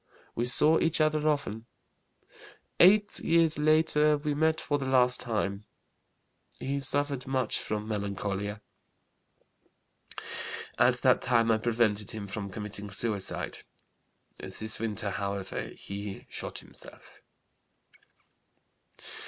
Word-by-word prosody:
We 120 - -1
saw 150 +6 +4
each 165 -1 +1
other 155 0 +2
often. 115 -6 -2 1.1
Eight 205 +3 +6
years 165 -2 +3
later 150 -1 +4
we 150 0 -2
met 160 +2 +2
for 145 -1 -1
the 135 - -3
last 125 -1 +4
time. 105 -3 -2 0.9
He 140 +1 -2
suffered 140 -1 -1
much 130 -3 0
from 105 0 -4
melancholia. 100 0 -3 2.2
At - - +5
that - - +5
time 115 -2 +3
I 110 - +3
prevented 110 -3 +1
him 110 -2 -5
from 100 +1 -5
committing 105 0 -6
suicide. 100 -1 -2 0.8
This 110 0 -5
winter, 105 -2 -1
however, 100 -1 -3
he 100 0 -7
shot - - -5
himself. - - -12
115 Hz, 105 wpm, -29 LUFS, 105-150 Hz, 2.2 s, Eight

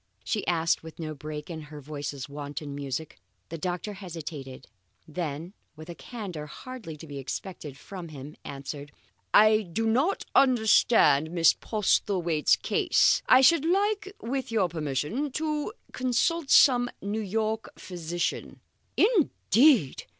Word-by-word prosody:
she 215 - -2
asked, 165 -1 +1
with 160 -1 -11
no 155 -2 -5
break 150 +1 -7
in 165 -2 -6
her 150 0 -10
voice's 145 -1 -6
wonted 145 +1 -7
music. 140 +2 -5 0.3
The 165 - -6
doctor 180 +5 -3
hesitated, 155 -9 -8 0.4
then 160 +1 -5 0.2
with 155 +2 -11
a - - -6
candour 180 -8 -7
hardly 220 - -9
to 155 - -11
be 145 -2 -7
expected 145 0 -6
from 180 +2 -9
him, 145 -1 -10
answered: 140 +1 -7 0.4
"I 215 0 +6
do 210 +4 -3
not 260 - +1
understand 220 - +4
Miss 165 -1 +4
Postlethwaite's 185 -6 +1
case. - - +2
I 255 - +7
should 280 +3 +5
like, 395 +4 +1
with 265 +1 -3
your 205 -6 +2
permission, 160 - -2
to 305 +3 -2 0.2
consult 265 +5 0
some 245 -3 +6
New 205 +2 -2
York 220 +2 -2
physician." 175 -1 -4 0.4
"Indeed!" 285 - +3
175 Hz, 130 wpm, -27 LUFS, 150-235 Hz, 0.4 s, I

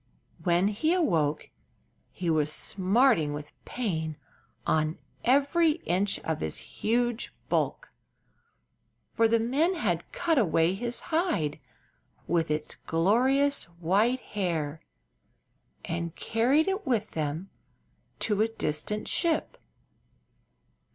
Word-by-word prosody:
When 175 +3 +3
he 270 +11 +1
awoke 160 - 0 0.6
he 180 - -5
was 155 -1 +1
smarting 190 - +2
with 150 +1 -7
pain 160 - -3 0.5
on 155 0 +1 0.3
every 285 +5 +3
inch 190 +3 +1
of 160 -1 -2
his 80 - -2
huge 240 +1 -1 0.2
bulk, - - -1 1.2
for 225 -1 +4
the 230 +1 +3
men 285 +11 +1
had 180 - -2
cut 330 -5 +1
away 165 -4 +3
his 240 +4 -1
hide 170 - 0 0.7
with 165 -1 0
its 150 0 -2
glorious 255 +12 +2
white 190 +9 +1
hair 165 -6 -2 1.1
and 170 0 -3
carried 260 +9 +2
it 390 +2 -1
with 225 -4 0
them 155 +4 -3 0.7
to 210 -1 +1
a 220 - +4
distant 210 0 -2
ship. 330 -3 +1
205 Hz, 105 wpm, -28 LUFS, 160-250 Hz, 1.2 s, for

